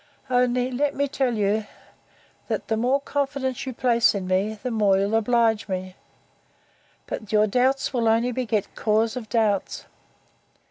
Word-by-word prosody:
Only, 250 0 +2
let 285 +3 0
me 285 +1 0
tell 265 -3 -1
you, 210 +1 0 0.8
that - - -3
the 220 - +2
more 250 +5 +1
confidence 275 -2 -3
you 260 - -3
place 235 -3 +3
in 195 -2 -3
me, 195 +4 0
the 250 - -2
more 205 -4 +3
you'll 200 +2 0
oblige 225 -1 +2
me: 185 -1 -4 1.1
but 215 - -6
your 215 0 +4
doubts 260 +6 +1
will 235 -3 +1
only 230 +3 +2
beget 230 -4 -2
cause 220 +2 +1
of 230 -4 -6
doubts. 210 -3 0
230 Hz, 150 wpm, -24 LUFS, 210-255 Hz, 1.1 s, your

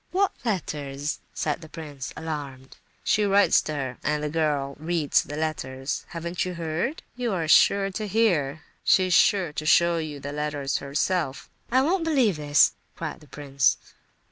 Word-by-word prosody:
"What 390 +2 +2
letters?" 150 - -3
said 150 +2 -2
the 160 - -11
prince, 145 -5 -7
alarmed. 140 -5 -6 0.3
"She 210 - +2
writes 200 0 +4
to 155 - -4
her—and 145 +2 -2
the 150 - -1
girl 145 -4 0
reads 160 -2 +1
the 145 - -7
letters. 135 -4 -3
Haven't 170 +1 -3
you 180 -1 -4
heard?—You 220 - -3
are 165 -4 -1
sure 195 +5 +5
to 215 +2 -4
hear; 170 -9 +1 0.2
she's 185 -1 +4
sure 180 -6 +4
to 155 - -4
show 170 +1 +4
you 155 -3 -5
the 145 +1 -6
letters 145 -2 -2
herself." 145 +1 -2 0.2
"I 260 +2 +4
won't 345 +4 +1
believe 260 - +2
this!" 145 0 +4 0.2
cried 165 -1 -5
the 150 - -18
prince. 140 -2 +1
155 Hz, 155 wpm, -25 LUFS, 145-185 Hz, 0.3 s, sure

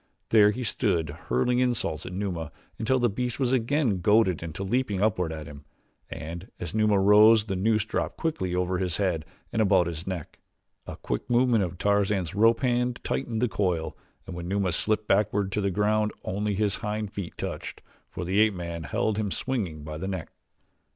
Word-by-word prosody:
There 105 -2 +6
he 125 +5 -3
stood 90 - 0 0.2
hurling 95 - +2
insults 115 - -1
at - - -6
Numa 90 -5 -3 0.3
until 115 +4 +2
the 120 -1 +3
beast 125 +4 -3
was 130 -1 +1
again 125 - +1
goaded 105 -4 +3
into 85 +3 -5
leaping 105 -1 0
upward 95 -5 +1
at 80 -1 -6
him, 70 0 -11 0.5
and 85 +4 -7
as 85 - -5
Numa 105 -2 +3
rose 105 +2 +6
the 95 -3 -3
noose 110 +3 +1
dropped 110 - -3
quickly 95 - -2
over 90 0 0
his 90 -3 0
head 90 -6 0 0.3
and 110 - +2
about 95 -4 +4
his 85 +1 -5
neck. 90 -5 -5 0.5
A - - -6
quick - - -4
movement 120 -3 +3
of 90 -1 -4
Tarzan's 100 -3 +1
rope 115 +3 +4
hand 125 -1 +1
tightened 120 -3 -2
the - - +4
coil 90 -7 -1 0.3
and 95 - -7
when 85 0 -6
Numa 95 -1 0
slipped 110 +4 0
backward 100 -1 +1
to 105 - -1
the 100 - +1
ground 105 +2 +1
only 100 +2 -2
his 105 0 +1
hind 105 -2 -3
feet 95 -4 -6
touched, - - -6 0.3
for 90 - -5
the 95 +4 +1
ape 110 -2 +4
man 85 -2 -5
held 110 +2 0
him 105 -2 -1
swinging 95 - -3
by 75 0 -6
the 95 - -4
neck. 95 -4 -5
100 Hz, 190 wpm, -27 LUFS, 90-110 Hz, 0.5 s, There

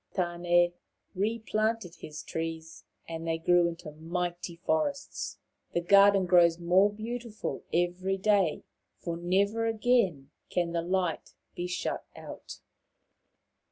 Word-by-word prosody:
Tan6 175 -1 +2 0.4
re 210 +4 0
planted 215 -3 -1
his 150 0 -8
trees, 165 0 -5 0.2
and 165 0 -5
they 165 0 0
grew 175 +1 +4
into 170 -2 -6
mighty 175 +2 -4
forests. 170 - -2 0.4
The 175 - +2
garden 200 +1 +6
grows 170 -2 +5
more 180 +4 +4
beautiful 225 +1 -5
every 180 +3 0
day, 195 -4 +2 0.3
for 170 -1 -4
never 200 +6 +1
again 215 - +1 0.2
can 175 -1 0
the 170 0 0
light 180 -1 -2 0.2
be 175 - -4
shut 175 -1 -3
out. - - -10
175 Hz, 120 wpm, -29 LUFS, 170-200 Hz, 0.4 s, garden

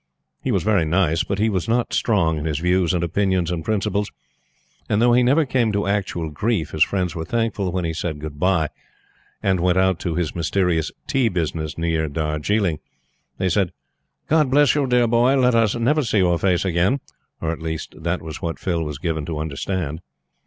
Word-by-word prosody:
He - - -1
was - - +1
very 105 -5 +3
nice; 80 0 +1
but 100 - -3
he 110 +2 +2
was 95 -2 -1
not 120 +1 +1
strong 85 -8 +1
in 75 - -5
his 75 -3 -1
views 90 +1 +2
and 90 -2 0
opinions 90 0 0
and 85 -2 -3
principles, 105 +1 -1 0.8
and 105 - +2
though 120 +1 +4
he 125 - +5
never 140 +6 +3
came 125 -4 +1
to 100 0 0
actual 95 -5 -1
grief 85 0 -1
his 75 - +4
friends 90 -3 -1
were 80 -2 -4
thankful 105 -1 -1
when 90 -1 -2
he 80 - -2
said 80 -1 -3
good 75 -1 -8
bye, 85 -3 +2 0.7
and 95 -2 +2
went 90 +1 +2
out 95 -2 +2
to 85 -3 -3
this 85 -3 -1
mysterious 85 -1 0
"tea" 130 -4 +1
business 80 -4 -3
near 80 -1 0
Darjiling. 80 +4 -1 0.6
They 95 - 0
said: 90 0 +1 0.5
"God 155 -3 +3
bless 145 +1 +4
you, 145 -2 +1
dear 125 -1 +3
boy! 120 +3 +3
Let 125 -1 +3
us 115 -2 +3
never 130 +7 +2
see 110 -3 0
your 90 -3 +3
face 90 -1 +1
again," 95 +9 +2 0.4
or 80 - -1
at 85 - -6
least 80 -1 -4
that 85 +2 -2
was 80 -1 -7
what 85 -1 -3
Phil 85 -3 -1
was 75 -3 -5
given 80 0 -2
to 80 -2 -3
understand. 80 +1 -3
90 Hz, 200 wpm, -22 LUFS, 80-110 Hz, 0.8 s, he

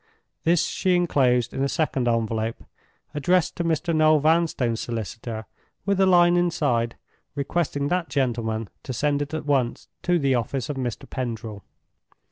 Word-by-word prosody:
This 170 0 +3
she 185 -1 +1
inclosed 130 -9 +2
in - - -3
a 140 - +1
second 135 -6 0
envelope, 115 -1 -1 0.5
addressed 175 +4 +1
to 170 - -1
Mr. 165 0 0
Noel 155 0 +5
Vanstone's 150 -7 +2
solicitor, 110 0 -5 0.4
with 200 -1 +1
a 190 - +5
line 175 -1 +5
inside, 145 -10 +1 0.4
requesting 145 0 -1
that 180 -2 0
gentleman 115 -5 -1
to 130 - -5
send 145 +3 0
it 145 +2 -3
at 155 - -4
once 135 -5 0
to 180 0 +2
the 140 -4 +2
office 125 +3 -2
of 145 - -2
Mr. 125 -4 -4
Pendril. 115 -5 -5
140 Hz, 150 wpm, -24 LUFS, 120-165 Hz, 0.5 s, Noel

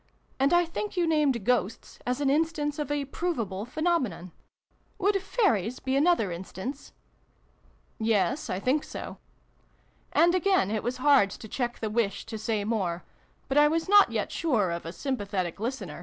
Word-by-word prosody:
And 275 +1 +3
I 350 0 +4
think 375 +4 -5
you 350 - +3
named 295 -9 +1
Ghosts 245 -4 -1
as 250 +2 0
an 280 - +2
instance 300 -1 0
of 295 -2 -3
a 290 -1 -1
provable 230 - -3
phenomenon. 255 - -1 0.7
Would 400 0 +1
Fairies 255 - 0
be 265 0 -1
another 285 - +3
instance? 190 +10 -7 0.4
" - - -39
" - - -35 0.2
Yes, 235 +9 0
I 185 - -1
think 260 +8 +1
so." - - -8 0.9
And 345 +1 +4
again 370 - +2
it 215 -1 -1
was 245 +2 -3
hard 265 -6 +5
to 220 - -9
check 240 +2 -3
the 220 - -1
wish 215 -3 -1
to 225 -1 -6
say 215 -1 -1
more: 190 -6 -1 0.4
but 275 +2 +3
I 295 - +7
was 325 +3 0
not 410 +1 +6
yet - - -2
sure 230 - +1
of 170 -1 -5
a - - -4
sympathetic 200 - -3
listener. 245 +5 -4
260 Hz, 170 wpm, -27 LUFS, 205-315 Hz, 0.9 s, I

